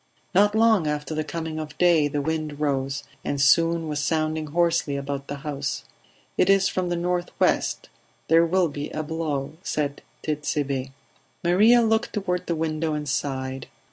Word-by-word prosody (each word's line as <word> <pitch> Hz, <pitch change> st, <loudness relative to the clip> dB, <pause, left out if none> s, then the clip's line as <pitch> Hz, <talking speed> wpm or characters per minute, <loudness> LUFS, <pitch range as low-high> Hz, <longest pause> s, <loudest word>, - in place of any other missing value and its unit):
Not 205 Hz, +3 st, +4 dB
long 220 Hz, -7 st, +4 dB
after 150 Hz, 0 st, -2 dB
the 155 Hz, 0 st, -1 dB
coming 160 Hz, -1 st, -4 dB
of 150 Hz, -1 st, -7 dB
day 170 Hz, -4 st, +4 dB
the 145 Hz, 0 st, -2 dB
wind 155 Hz, -1 st, -3 dB
rose, 135 Hz, -2 st, -1 dB, 0.2 s
and 140 Hz, -, -2 dB
soon 165 Hz, +4 st, +4 dB
was 150 Hz, -1 st, -2 dB
sounding 155 Hz, +1 st, 0 dB
hoarsely 165 Hz, -2 st, +1 dB
about 140 Hz, 0 st, -4 dB
the 145 Hz, -, -4 dB
house. 140 Hz, -2 st, -3 dB, 0.6 s
"It 180 Hz, -, +4 dB
is 195 Hz, -1 st, +5 dB
from 185 Hz, -1 st, -1 dB
the 175 Hz, -, 0 dB
nor'west; 175 Hz, +1 st, 0 dB, 0.4 s
there 165 Hz, +1 st, +5 dB
will 180 Hz, +1 st, +2 dB
be 145 Hz, -1 st, -5 dB
a 155 Hz, -, -3 dB
blow," 150 Hz, -2 st, -3 dB
said 145 Hz, -5 st, -2 dB, 0.2 s
Tit'Sebe. 145 Hz, -3 st, -2 dB, 0.5 s
Maria 215 Hz, +8 st, +5 dB
looked 225 Hz, 0 st, +1 dB
toward 180 Hz, -4 st, -2 dB
the 170 Hz, -, 0 dB
window 155 Hz, 0 st, -1 dB
and 150 Hz, 0 st, -4 dB
sighed. 130 Hz, -2 st, -3 dB
155 Hz, 160 wpm, -25 LUFS, 145-175 Hz, 0.6 s, is